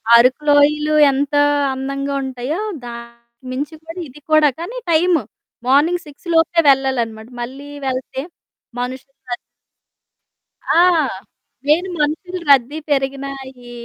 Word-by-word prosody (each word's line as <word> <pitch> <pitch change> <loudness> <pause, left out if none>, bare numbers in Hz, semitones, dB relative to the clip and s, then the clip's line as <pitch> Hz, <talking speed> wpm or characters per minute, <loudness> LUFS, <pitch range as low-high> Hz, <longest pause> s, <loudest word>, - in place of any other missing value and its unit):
అరుకు 255 +5 +4
లోయలు 300 +1 +4 0.2
ఎంతా 285 +2 +1 0.3
అందంగా 275 +1 -3
ఉంటాయో, 265 +6 -3 0.3
దానికి 235 +1 -11
మించి 290 +5 -4
కూడా 330 +3 -8
ఇది 280 +3 -14
కూడా, 310 -1 +6
కానీ 450 +9 -6
టైము. 330 -1 +3 0.5
మార్నింగ్ 320 +6 +3
6 295 +4 -14
లోపే 330 +1 +3
వెళ్ళాలనమాట. 240 -4 +1
మళ్ళీ 270 +4 -7 0.2
వెళ్తే 260 0 -3 0.6
మనుషులు 260 +2 -5 0.2
రద్ 240 - 0 1.4
ఆ! - - +6 0.9
నేను 340 +5 +3
మనుషులు 355 +5 -2
రద్దీ 275 +3 +4
పెరిగినా, 275 0 -1 0.4
ఈ - - -10
275 Hz, 115 wpm, -19 LUFS, 255-310 Hz, 1.4 s, కూడా